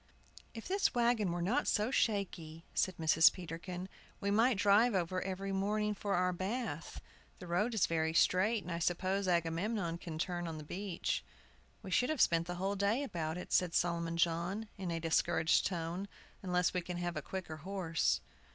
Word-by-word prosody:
"If 225 - -7
this 390 -5 +1
wagon 235 -5 +2
were 175 0 -2
not 240 +11 +1
so 215 +3 +1
shaky," 175 -9 -1
said 185 -2 0
Mrs. 160 0 +6
Peterkin 175 +1 -6 0.3
"we 200 0 -1
might 225 +2 +4
drive 205 +3 +4
over 185 0 0
every 195 +1 -3
morning 210 +2 0
for 200 0 -2
our 180 0 +2
bath. 190 - -4 0.4
The - - -10
road 205 +7 0
is 210 - +4
very 160 -1 0
straight, 205 +6 +3
and 180 - -6
I 170 - -2
suppose 185 +3 0
Agamemnon 170 +1 0
can 165 -3 -6
turn 175 +1 -2
on 160 -1 -5
the 155 - -7
beach." 185 +3 -3 0.6
"We 190 - -7
should 250 +6 +3
have 310 - 0
to - - +6
spend 165 0 +2
the 175 0 -4
whole 195 +3 -1
day 200 +7 +1
about 170 - -3
it," 180 - -6
said 180 -2 +2
Solomon 170 -1 0
John, 175 +6 0
in 190 -2 -5
a 165 -1 -1
discouraged 165 0 +2
tone, 175 +2 -3 0.3
"unless 180 -2 +1
we 180 - 0
can 175 +1 -5
have 175 0 -3
a - - -2
quicker 180 -5 -6
horse." 175 -1 0
180 Hz, 185 wpm, -34 LUFS, 170-200 Hz, 0.6 s, Mrs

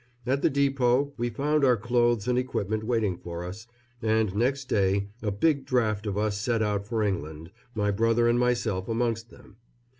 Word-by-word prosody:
At 135 +2 0
the - - +3
depot 140 -1 +2
we 120 +1 -2
found 145 +6 0
our 125 -3 +5
clothes 120 -1 +1
and 125 - +2
equipment 110 -4 -1
waiting 110 -6 0
for 85 0 -6
us, 100 +6 -8 0.3
and 110 -3 +1
next 130 +5 0
day 100 -2 +1
a 105 - -1
big 140 +8 +1
draft 110 -4 0
of 100 -1 -2
us 105 -1 0
set 115 +1 0
out 100 -1 -1
for 110 -1 -1
England, 80 -4 -3 0.2
my 105 -1 +1
brother 115 +3 +2
and 120 +1 +3
myself 115 -6 0
amongst 115 0 -1
them. - - -17
115 Hz, 180 wpm, -27 LUFS, 100-125 Hz, 0.3 s, our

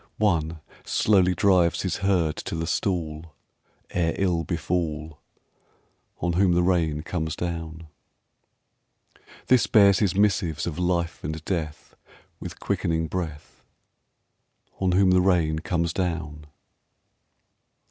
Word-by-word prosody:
One 85 -6 0 0.2
slowly 95 -4 +2
drives 90 -2 +3
his 95 -3 -1
herd 90 -6 +1
to - - -5
the 80 0 -2
stall 80 -3 -3 0.6
Ere 85 -2 0
ill 90 -4 +1
befall, 80 -2 -3 1.0
On 85 +1 0
whom 90 0 +3
the 90 0 +2
rain 80 -4 +1
comes 80 -3 -3
down. 80 -2 -5 1.6
This 125 -3 +4
bears 100 -3 +5
his 100 -4 +1
missives 95 -6 +1
of 85 0 -4
life 85 -2 -1
and 80 +1 -5
death 80 -5 -4 0.4
With - - -8
quickening 80 -1 -1
breath, 80 -5 -6 1.2
On 95 -2 +1
whom 95 0 +4
the 90 0 +4
rain 85 -4 +2
comes 85 0 -1
down. 80 -5 -3
85 Hz, 115 wpm, -25 LUFS, 80-90 Hz, 1.6 s, bears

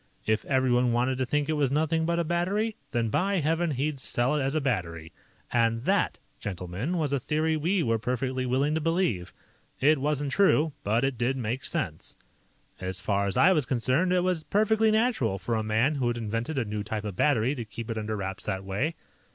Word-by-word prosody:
If 110 0 +1
everyone 125 -2 +2
wanted 125 +2 +1
to 130 - 0
think 150 +2 0
it 155 - 0
was 145 -4 +1
'nothing 160 +2 +1
but 170 0 +1
a 170 - +2
battery', 190 +7 0
then, 115 -3 0
by 195 - +1
Heaven, 165 0 +1
he'd 140 +1 -2
sell 130 +2 0
it 150 - +1
as 135 +3 -1
a - - +3
battery. 85 - -2 0.4
And 115 0 +1
that, - - +1 0.2
gentlemen, 95 - -3
was 150 -4 0
a 140 - +2
theory 155 +4 0
we 170 +4 +1
were 115 -3 +1
perfectly 130 +2 -2
willing 135 +4 +1
to 160 - 0
believe. 165 - 0 0.5
It 150 +2 +4
wasn't 145 -1 0
true, 160 -5 +3
but 110 +4 +1
it 135 -3 -1
did 125 +3 +1
make 125 +2 -3
sense. 140 - -3 0.6
"As 95 0 -4
far 100 0 0
as 100 - -2
I 180 - +6
was 150 -8 +2
concerned, 130 +9 +1
it 180 -1 +3
was 180 -3 0
perfectly 220 +3 +2
natural 220 - +1
for 115 +5 -3
a 110 - +1
man 110 +7 +1
who 135 -4 -1
had 120 0 0
invented 115 +6 -3
a 125 - +1
new 105 0 -3
type 105 0 -4
of 105 -3 -5
battery 130 +1 +2
to 125 -5 -4
keep 115 +1 -7
it 115 - -3
under 110 0 -3
wraps 95 -1 -4
that 95 0 -2
way. 125 - -1
130 Hz, 210 wpm, -27 LUFS, 110-160 Hz, 0.6 s, I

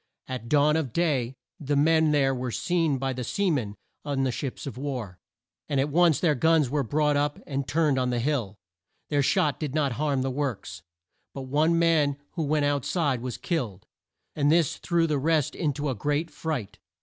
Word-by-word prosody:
At 125 -3 -6
dawn 150 +2 +4
of 140 -7 -3
day 135 -7 0 0.2
the 145 -1 -1
men 160 +2 +4
there 140 -3 +3
were 125 -1 -3
seen 165 +1 0
by 135 0 -2
the 125 0 -4
sea 195 - 0
men 110 -9 -2 0.3
on 140 -2 -1
the 130 - +1
ships 135 +1 -5
of 135 - -6
war, 125 -9 -5 0.5
and 140 - +1
at 140 +2 +1
once 165 -2 +4
their 165 -4 +3
guns 155 -1 +2
were 145 0 +1
brought 150 +4 +1
up 145 +1 0
and 140 -2 -3
turned 145 -1 +2
on 125 -1 0
the 120 - 0
hill. 120 -7 -1 0.5
Their 145 -1 +2
shot 145 +1 +1
did 150 -3 -4
not 145 -3 +1
harm 140 +1 0
the 135 - -1
works, 125 -11 -4 0.5
but 135 - -5
one 155 +5 +2
man 160 -4 +3
who 170 - -4
went 150 -1 +1
out 145 -2 0
side 145 -8 0
was 125 -1 -4
killed, 120 - -3 0.5
and 145 -1 +2
this 165 -3 +2
threw 170 -1 +1
the 150 -3 0
rest 155 0 +1
in 155 -4 -1
to 145 +1 -3
a - - 0
great 150 +8 -1
fright. 125 -11 -4
145 Hz, 200 wpm, -26 LUFS, 130-155 Hz, 0.5 s, dawn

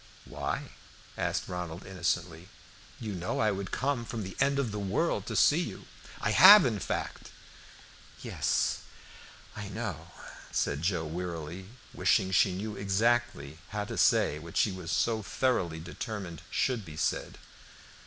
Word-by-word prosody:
"Why?" - - -4 0.5
asked - - -1
Ronald, 90 0 -5
innocently. 90 -1 -2 0.5
"You 110 -3 -4
know 90 -1 -3
I 110 -1 +3
would 100 0 -4
come 135 -2 -1
from 115 -2 -5
the 95 0 -7
end 140 0 +3
of 135 -6 0
the 105 - -4
world 95 -2 0
to - - -3
see - - +5
you. - - -6 0.3
I 105 - 0
have, 195 - +10
in 110 -5 0
fact." - - -4 0.9
"Yes, - - 0 0.8
I - - -6
know," - - -5 0.4
said 70 +1 0
Joe 85 -1 0
wearily, 85 +1 -5 0.3
wishing 95 0 +2
she 95 0 +4
knew 105 +3 -4
exactly 100 -6 0
how 105 0 -3
to - - -6
say 75 - +3
what 80 +1 -8
she 105 - +3
was 95 -3 -6
so 115 -2 +1
thoroughly 100 -8 0
determined 90 -1 -6
should 125 -5 0
be 80 -4 -10
said. - - -1
95 Hz, 145 wpm, -30 LUFS, 85-110 Hz, 0.9 s, have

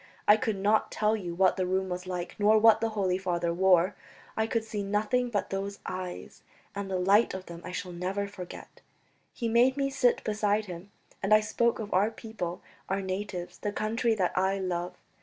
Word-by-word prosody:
I 210 - +9
could 220 0 -1
not 205 +3 +2
tell 215 +1 +1
you 175 -5 -5
what 185 +1 +3
the 185 - 0
room 190 +1 0
was 180 0 -5
like 180 -1 -4
nor 210 +1 +5
what 220 0 +6
the 225 - +1
Holy 185 -2 +1
Father 175 -2 -1
wore; 185 +1 +4 0.4
I 220 0 +1
could 225 0 0
see 215 -2 -4
nothing 215 +5 0
but 205 -4 -2
those 200 +1 -3
eyes, 185 -1 -6 0.3
and 200 -1 -4
the 190 - -1
light 195 +4 +3
of 190 0 -7
them 170 0 -9
I 180 - -6
shall 180 0 -5
never 190 +3 -2
forget. 185 -3 -10 0.5
He 235 - -3
made 245 +4 +4
me 275 -1 0
sit 250 -2 +2
beside 210 0 0
him, 180 +1 -8 0.3
and 195 - -2
I - - +6
spoke 235 +2 +1
of 215 -2 -5
our 200 +4 +3
people, 220 -6 -6 0.3
our 195 +1 -1
natives, 185 -2 -4
the 205 - -2
country 225 +2 0
that 185 -4 0
I 190 +1 +2
love. 180 -1 -3
195 Hz, 200 wpm, -29 LUFS, 185-215 Hz, 0.5 s, I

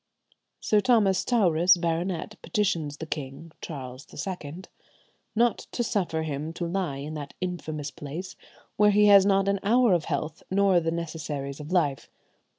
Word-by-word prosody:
Sir 210 -1 +2
Thomas 210 -6 +3
Towris, 180 -6 +4
baronet, 170 +4 -2
petitions 170 -10 -1
the 160 - -6
king 150 +1 -6
(Charles 130 -4 -7
II) 180 -3 -6 0.7
"not 235 +1 +1
to 240 - 0
suffer 175 -7 -1
him 155 +1 -4
to 175 - -4
lie 170 -5 -2
in 145 +3 -6
that 145 -2 -7
infamous 155 -5 -4
place, 155 +6 -7 0.4
where 210 0 +6
he 210 0 +5
has 200 -1 +7
not 195 -1 +3
an 200 0 +1
hour 235 +1 +4
of 170 -4 +1
health, 155 +1 -3
nor 195 -1 +4
the 165 -1 -1
necessaries 150 -4 -4
of 150 +3 -8
life. 145 -8 0
170 Hz, 155 wpm, -27 LUFS, 150-195 Hz, 0.7 s, has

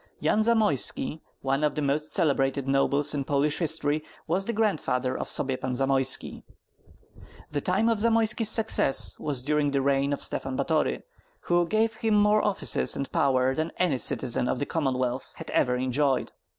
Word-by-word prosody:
Yan - - +1
Zamoyski, 215 - +1 0.2
one 135 +2 0
of 150 -2 0
the 150 - -2
most 145 +2 -1
celebrated 140 -5 +1
nobles 140 +2 +2
in 140 -2 -2
Polish 145 +2 0
history, 155 -2 0 0.2
was 185 +4 -1
the 235 - -2
grandfather 155 - -1
of - - -4
Sobiepan 130 -1 -1
Zamoyski. 135 0 -1 1.1
The 145 -1 -2
time 195 +8 +1
of 230 -2 +1
Zamoyski's 225 0 +2
success 220 -11 +2
was 140 -4 -1
during 150 +1 +1
the 140 -1 0
reign 140 0 +1
of 145 - -2
Stephen 135 -1 -3
Batory, 155 +2 0 0.4
who 175 0 +1
gave 220 +3 +1
him 220 -1 0
more 210 +1 +4
offices 205 -2 +1
and 140 - -5
power 130 -1 +1
than 155 +4 -3
any 165 -8 +1
citizen 125 -2 0
of - - -1
the 145 - -2
Commonwealth 130 -5 -2
had - - -8
ever 125 0 +1
enjoyed. 130 +1 0
145 Hz, 165 wpm, -26 LUFS, 135-180 Hz, 1.1 s, more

